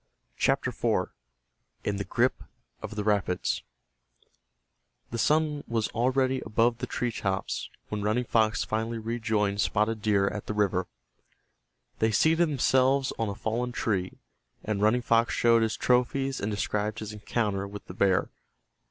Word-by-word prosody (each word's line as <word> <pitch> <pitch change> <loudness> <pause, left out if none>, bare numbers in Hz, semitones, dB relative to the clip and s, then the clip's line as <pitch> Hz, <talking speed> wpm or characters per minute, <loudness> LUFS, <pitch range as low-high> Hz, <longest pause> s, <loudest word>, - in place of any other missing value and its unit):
CHAPTER - - +1
IV—IN - - -4
THE 100 - -2
GRIP 95 - 0 0.4
OF - - -6
THE 105 - -2
RAPIDS 100 -3 0 1.5
The 115 - -3
sun 150 +2 +2
was 115 -2 0
already 130 +2 +1
above 115 +2 +1
the - - -3
tree 120 -1 -2
tops 95 -3 -2 0.2
when 105 -1 -3
Running 110 +4 +1
Fox 110 -2 +2
finally 115 +1 -2
rejoined 110 -3 0
Spotted 105 +1 +1
Deer 100 -2 +2
at 105 +1 -4
the 105 - -3
river. 95 -3 +1 1.1
They 110 - +3
seated 160 +9 +3
themselves 135 -1 +2
on 115 -2 0
a 100 - -4
fallen 120 +4 -2
tree, 95 -7 -1 0.5
and 105 -2 -2
Running 115 +4 +3
Fox 115 0 +2
showed 115 -1 +4
his 110 -1 0
trophies 130 +2 +1
and 100 - -1
described 105 +1 -1
his 110 -1 -6
encounter 105 -2 -2
with 100 0 -9
the - - -9
bear. 95 0 +2
110 Hz, 145 wpm, -28 LUFS, 105-120 Hz, 1.5 s, showed